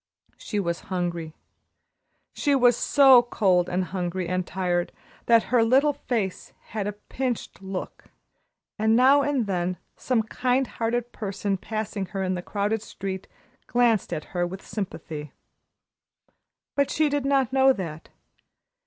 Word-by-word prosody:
She 210 - -3
was 170 -3 -1
very - - -19
hungry. 175 -4 -3 1.0
She 285 -2 +1
was 245 -3 +5
so 270 -3 +6
cold 185 -7 +2
and 185 +1 0
hungry 180 0 -3
and 185 0 -1
tired 175 -1 -1 0.4
that 230 -1 +6
her 240 -2 +6
little 270 +6 +4
face 230 -9 -3 0.2
had 210 -3 -3
a 205 - -2
pinched 240 +2 -4
look, 190 -1 -6 0.7
and 220 +1 +3
now 265 +4 +6
and 280 -4 0
then 180 -2 -1 0.2
some 245 -4 0
kind 250 +4 0
hearted 240 0 -2
person 200 -1 -2
passing 210 -1 -4
her 190 +2 -3
in 185 0 0
the 180 - -3
crowded 205 +3 -1
street 190 -3 -6 0.4
glanced 240 -4 +2
at 155 - -3
her 175 -1 0
with 190 +2 -9
sympathy. 155 -7 -6 1.4
But 280 -1 +1
she 310 +1 +2
did 290 -1 0
not 270 -2 +1
know 265 0 +6
that. 165 -9 -5
205 Hz, 145 wpm, -25 LUFS, 185-245 Hz, 1.4 s, so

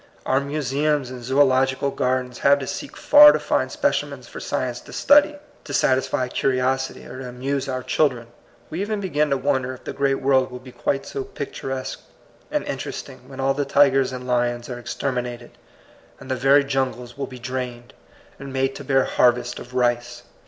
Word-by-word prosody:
Our 130 - +2
museums 140 -1 -1
and 125 -1 -8
zoological 130 +1 +2
gardens 125 -1 -1
have 140 0 +5
to 135 - -5
seek 285 - -6
far 295 0 +9
to - - 0
find - - 0
specimens - - -1
for - - -9
science - - -2
to - - -13
study, 295 +1 +5 0.3
to 145 - -4
satisfy 130 -1 +1
curiosity, 130 +1 -1
or 130 - -9
to 130 -1 -6
amuse 135 +2 -3
our 130 -1 -3
children. 125 -6 +1 0.5
We 165 +4 -3
even 210 +1 -2
begin 150 -6 0
to 140 - +2
won 135 0 +1
der 130 +1 -5
if - - -17
the - - -5
great 140 -1 +1
world 130 -1 +2
will 125 - -7
be 130 0 -12
quite 135 +2 -2
so 135 - -4
picturesque 135 -2 -5 0.5
and - - -1
interesting 130 - -6
when 135 -1 -10
all 135 +1 +2
the 145 +1 -1
tigers 135 -2 +3
and 125 0 -6
lions 120 0 -1
are 120 - -5
exterminated, 125 -1 -4 0.7
and 130 - -8
the - - +1
very 135 +2 +4
jungles 130 -3 -2
will 140 - -4
be 130 - -10
drained, 125 -1 -5 0.5
and 135 0 -8
made 135 0 0
to 140 - -8
bear 135 -1 +3
harvests 120 0 +2
of 125 +1 -11
rice. 120 -1 0
130 Hz, 185 wpm, -23 LUFS, 125-140 Hz, 0.7 s, far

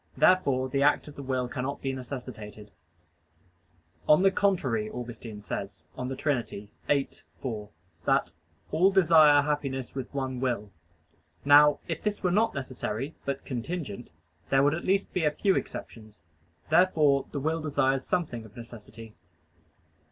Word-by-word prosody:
Therefore 140 -8 +3
the 140 +1 -1
act 145 +2 +3
of 145 - -10
the - - -7
will 130 -2 -1
cannot 130 +3 -4
be 135 -1 -2
necessitated. 120 -5 -8 1.4
On 150 +5 +6
the 195 - +5
contrary, 135 - +1
Augustine 115 -3 -8
says 100 -5 -6
(De 130 +1 -4
Trin. 140 -4 0
xiii, 100 -1 -10 0.7
4) 110 -5 -5 0.4
that - - +2 0.4
"all 185 +4 +4
desire 160 -6 +6
happiness 140 -3 -2
with 130 -2 -5
one 130 -2 -3
will." 120 -6 -2 0.7
Now 145 +1 +7
if - - -3
this 210 -1 -2
were 180 - +2
not 220 +2 +2
necessary, 130 0 -4
but 140 -1 -3
contingent, 130 - -5 0.4
there 135 0 +4
would 145 +1 +3
at 165 - -4
least 195 +1 +1
be 180 - 0
a 150 - +4
few 190 +6 +1
exceptions. 110 -2 -6 0.5
Therefore 155 -7 +4
the 145 - -3
will 160 +3 -1
desires 135 -3 +1
something 135 -10 -2
of 110 0 -15
necessity. 115 -1 -11
135 Hz, 145 wpm, -28 LUFS, 120-150 Hz, 1.4 s, Now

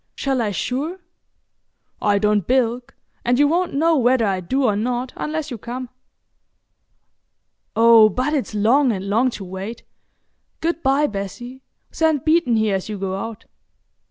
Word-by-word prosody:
"Shall 270 -2 -1
I 220 - 0
sure?" 275 - -3 1.0
"I 205 -1 +2
don't 210 -2 +1
bilk, 250 0 0 0.3
and 245 +1 +2
you 290 +1 +4
won't 345 +1 0
know 325 +3 +3
whether 250 -3 +3
I 195 -2 0
do 260 +10 -1
or 215 -5 +2
not 245 +4 -2
unless 310 -1 -4
you 240 - -6
come. 245 +3 -6 1.9
Oh, 225 -1 +7
but 255 +8 -1
it's 265 -7 -2
long 245 +6 +3
and 195 -2 -4
long 230 +6 +2
to 210 - -7
wait! 190 +5 -7 0.8
Good 335 +1 -2
bye, 275 +1 +2
Bessie,—send 255 - -4
Beeton 315 -6 +3
here 220 -2 +1
as 190 +2 -3
you 210 - -4
go 190 -1 -3
out." 225 +2 -6
245 Hz, 150 wpm, -21 LUFS, 210-275 Hz, 1.9 s, Oh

